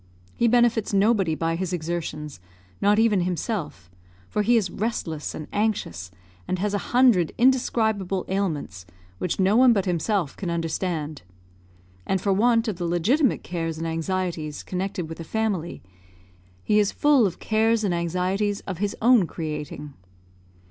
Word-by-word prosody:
He 235 - +2
benefits 235 -3 +2
nobody 195 -5 +3
by 165 +1 -1
his 185 +1 -3
exertions, 155 - -4 0.4
not 205 +1 +4
even 220 -4 +3
himself; 175 - -3 0.4
for 210 - -1
he 235 +3 +4
is 195 -5 0
restless 170 -8 -3
and 155 - -7
anxious, 205 - -1 0.5
has 205 +2 -1
a - - +2
hundred 240 -10 +4
indescribable 220 -7 +1
ailments, 155 - -3 0.3
which 180 - -2
no 190 +2 +3
one 250 0 +6
but 195 -4 0
himself 180 -2 -1
can 185 - -4
understand; 165 -2 -2 0.8
and 190 - 0
for 195 +1 +1
want 230 +3 +3
of 210 -5 -2
the 175 - -3
legitimate 225 - +2
cares 165 -2 -3
and 165 - -4
anxieties 165 -2 -3
connected 185 -1 -3
with 160 +1 -8
a - - -5
family, 200 - -2 0.8
he 210 - +3
is 205 -1 +2
full 285 -7 +4
of 175 - -6
cares 220 +1 +1
and 195 -4 +1
anxieties 185 +4 -1
of 185 -3 -6
his 205 0 -1
own 235 -7 +5
creating. 150 -2 -6
190 Hz, 150 wpm, -24 LUFS, 165-215 Hz, 0.8 s, one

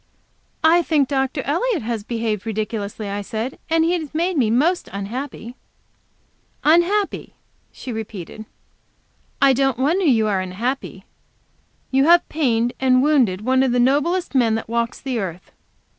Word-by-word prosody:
"I 330 +2 +5
think 300 -5 +1
Dr. 270 0 -1
Elliot 350 - -1
has 225 -2 -3
behaved 225 -2 -3
ridiculously," 215 -1 -4
I 200 +1 -3
said, 225 +5 -5
"and 325 0 +3
he 340 - +1
has 315 -4 -4
made 345 +3 0
me 245 -7 +2
most 310 +11 +1
unhappy." 230 +4 -6 1.1
"Unhappy!" 345 +6 +2 0.4
she 255 - -8
repeated. 220 -2 -7 1.0
"I 275 -1 +6
don't 270 -1 +1
wonder 325 +9 +1
you 230 -7 +3
are 200 -3 0
unhappy. 225 +9 -4 0.9
You 270 +1 +3
have 345 +2 +5
pained 245 -6 0
and 255 -1 +3
wounded 255 -11 +2
one 260 +3 +2
of 260 -2 +1
the 245 - +2
noblest 295 +9 +1
men 235 -5 +3
that 225 - -4
walks 235 +1 -2
the 260 -4 -3
earth." 180 -3 -6
255 Hz, 145 wpm, -21 LUFS, 220-305 Hz, 1.1 s, I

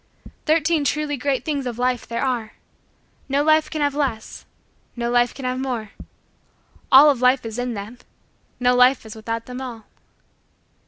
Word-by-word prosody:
Thirteen 315 0 +2
Truly 295 0 -1
Great 275 0 -2
Things 285 -4 -2
of 235 -2 -5
Life 250 -1 -1
there 235 0 -3
are. 235 -4 -2 0.8
No 280 +2 +2
life 310 0 +3
can 310 - -4
have 285 -1 +1
less. 265 -7 -3 0.5
No 235 -1 -2
life 240 0 +3
can 270 - -9
have 255 0 -2
more. 240 -6 -4 1.0
All 285 +3 +9
of 260 -3 -4
life 255 0 +3
is 225 +1 -5
in 245 -1 -2
them. 210 +5 -8 0.6
No 250 0 +3
life 250 0 +4
is 220 +1 -9
without 225 +1 -5
them 250 +1 -7
all. 235 -4 -8
250 Hz, 165 wpm, -22 LUFS, 235-280 Hz, 1.0 s, All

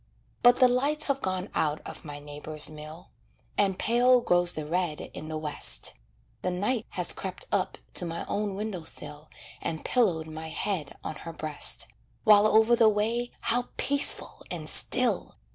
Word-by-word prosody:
But 245 0 +6
the 255 -1 +5
lights 285 +5 0
have 275 0 -1
gone 185 +1 -3
out 150 -1 -1
of - - -9
my 145 -2 -8
neighbor's 150 +1 0
mill, 155 +3 -12 0.4
And 195 -2 +1
pale 245 +2 +3
grows 175 -4 +3
the 155 - -6
red 170 -1 -2
in 155 - -9
the 155 - -4
West; 155 -1 +2 0.5
The 185 - -2
Night 210 +6 -2
has - - +3
crept - - -5
up - - -1 0.2
to 180 - +3
my 165 0 -5
own 205 -1 -3
window 205 -3 -5
sill 150 -1 0 0.3
And 160 -2 -5
pillowed 185 -11 +1
my 160 0 -8
head 165 -4 -4
on 155 - -6
her 165 - -9
breast, 155 -2 +3 0.4
While 210 -1 +6
over 220 +2 +4
the 230 -2 +4
way 225 +4 -1
how 245 +1 -1
peaceful 285 0 +2
and - - -6
still! - - +2
185 Hz, 165 wpm, -27 LUFS, 155-230 Hz, 0.5 s, But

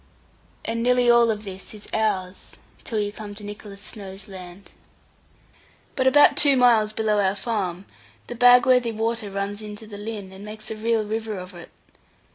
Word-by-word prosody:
And 230 0 -2
nearly 245 0 +4
all 235 -1 +5
of 215 -1 -2
this 190 +1 -8
is 210 - -11
ours, 200 -4 -2 0.3
till 225 - -4
you 205 0 -1
come 205 -1 -9
to 210 - -11
Nicholas 205 -1 -9
Snowe's 195 -2 -8
land. 185 0 -11 1.2
But 260 - +1
about 290 +2 +6
two 285 -2 +5
miles 230 -4 +4
below 215 -1 0
our 195 -1 +2
farm, 200 -5 -2 0.4
the - - -7
Bagworthy 245 0 +5
water 225 -1 -2
runs 200 +1 -4
into 210 +1 -9
the 205 -1 -10
Lynn, 205 -3 -6
and 190 +1 -11
makes 215 +1 -8
a - - -3
real 220 0 0
river 220 0 -3
of 180 +1 -9
it. 175 -1 -11
215 Hz, 170 wpm, -24 LUFS, 200-230 Hz, 1.2 s, about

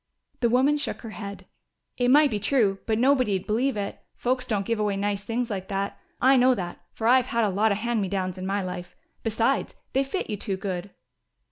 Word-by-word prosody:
The 235 - +2
woman 265 +5 +4
shook 295 - -4
her 225 - -7
head. 200 -3 -7 0.5
"It 245 0 +1
might 290 +1 +6
be 210 - -1
true, 210 -4 +2
but 220 -1 +2
nobody'd 250 -7 +2
believe 240 +3 +1
it. 200 -1 -4 0.2
Folks 250 +1 -1
don't 200 -3 0
give 230 0 -1
away 205 -2 0
nice 200 0 -1
things 235 +2 -2
like 190 -2 -4
that. 200 0 -3 0.2
I 265 +1 +5
know 255 +1 +5
that, 175 -4 -5
for 220 - -5
I've 255 +1 +5
had 235 -1 +1
a 210 - +2
lot 210 +3 +2
of 200 - +1
'hand 235 0 0
me 195 - -1
downs' 185 -1 -2
in 185 - -4
my 200 0 0
life.... 180 -1 -6 0.3
Besides, 230 +4 0 0.2
they 270 - +3
fit 320 +8 -3
you 210 - -3
too 195 -1 -3
good." 190 -1 -4
215 Hz, 220 wpm, -26 LUFS, 195-250 Hz, 0.5 s, might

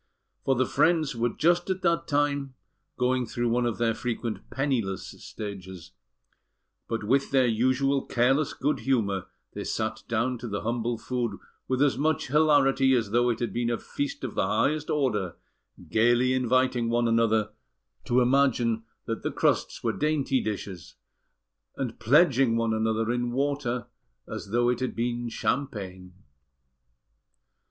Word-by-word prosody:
For 135 - +3
the 130 +1 +2
friends 155 -4 +2
were 120 +1 +1
just 175 +8 +1
at 190 0 -2
that 170 -1 +1
time 145 -2 0 0.4
going 125 -1 +1
through 120 +1 -1
one 120 +1 +1
of 115 - -2
their 115 -1 +1
frequent 115 -1 -4
penniless 125 -9 -1
stages; 95 -4 -8 1.0
but 115 -2 -3
with 135 +6 +2
their 135 -2 +4
usual 130 +4 +1
careless 135 +5 +2
good 145 +3 0
humour, 100 -8 0 0.3
they - - -5
sat - - -2
down 120 +2 0
to 120 - -6
the 100 -2 -3
humble 115 +1 -1
food 120 -3 -3 0.3
with 130 +2 +2
as 140 -2 +1
much 155 -2 0
hilarity 135 -3 +4
as 115 -5 -1
though 120 +2 +3
it 115 - 0
had 115 -5 -3
been 120 0 0
a 120 - 0
feast 285 - -4
of - - -4
the - - 0
highest 155 0 0
order, 105 - 0 0.5
gaily 120 +3 +3
inviting 130 -1 +1
one 120 0 +2
another 110 -2 +2 0.5
to 125 +1 +3
imagine 120 -3 +2 0.2
that 115 - -3
the - - -1
crusts - - 0
were - - +1
dainty 145 -3 +1
dishes, 100 -5 -6 0.8
and 125 -4 -4
pledging 135 -2 +4
one 115 -1 +1
another 110 +1 0
in 120 0 -1
water, 135 -2 -1 0.4
as 110 -2 -7
though 120 +3 +2
it 125 - +1
had 130 -1 -3
been 120 0 -2
champagne. 95 -9 -3
120 Hz, 150 wpm, -27 LUFS, 115-135 Hz, 1.0 s, their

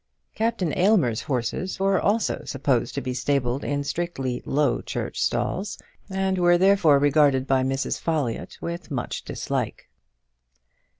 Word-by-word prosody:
Captain 220 -7 -1
Aylmer's 175 - +3
horses 135 +9 -2
were 195 0 +2
also 215 +2 +1
supposed 130 -3 0
to 140 - -1
be 130 -1 -3
stabled 125 0 0
in 145 0 -1
strictly 140 -5 -3
Low 145 +1 +1
Church - - -4
stalls, 195 +2 -1 0.3
and 190 -1 0
were 175 0 +5
therefore 185 -5 +5
regarded 145 -2 +3
by 135 -1 +2
Mrs. 135 +1 -1
Folliott 150 -8 -2
with 170 +1 -5
much 130 -5 -3
dislike. - - -4
145 Hz, 130 wpm, -24 LUFS, 130-185 Hz, 0.3 s, were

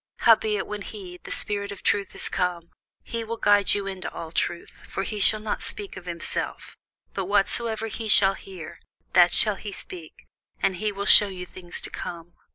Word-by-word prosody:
Howbeit 215 -2 +4
when 210 -1 -5
he, 190 -3 -8
the - - -10
Spirit 200 -1 +1
of 200 - -9
truth, 200 -1 +1
is - - -2
come, 175 -2 -2 0.3
he 230 -1 -4
will 230 +1 -4
guide 205 -2 +4
you 200 -1 -2
into 190 -1 -5
all 160 -1 -7
truth: 170 0 -3
for 195 - -2
he 210 +1 -4
shall 215 +2 +4
not 215 0 -3
speak 205 -2 -5
of 180 - -10
himself; 170 -1 -4 0.4
but 195 - -2
whatsoever 220 +3 +1
he 225 0 -5
shall 195 -1 +6
hear, 175 -4 -10 0.3
that 175 -1 +7
shall 210 +1 +3
he 210 - -6
speak: 175 -4 -10 0.3
and 190 -2 +1
he 210 +3 -1
will 200 0 -4
shew 205 0 +8
you 180 -2 -6
things 175 -1 -7
to - - -5
come. 170 0 -7
195 Hz, 190 wpm, -25 LUFS, 180-210 Hz, 0.4 s, shew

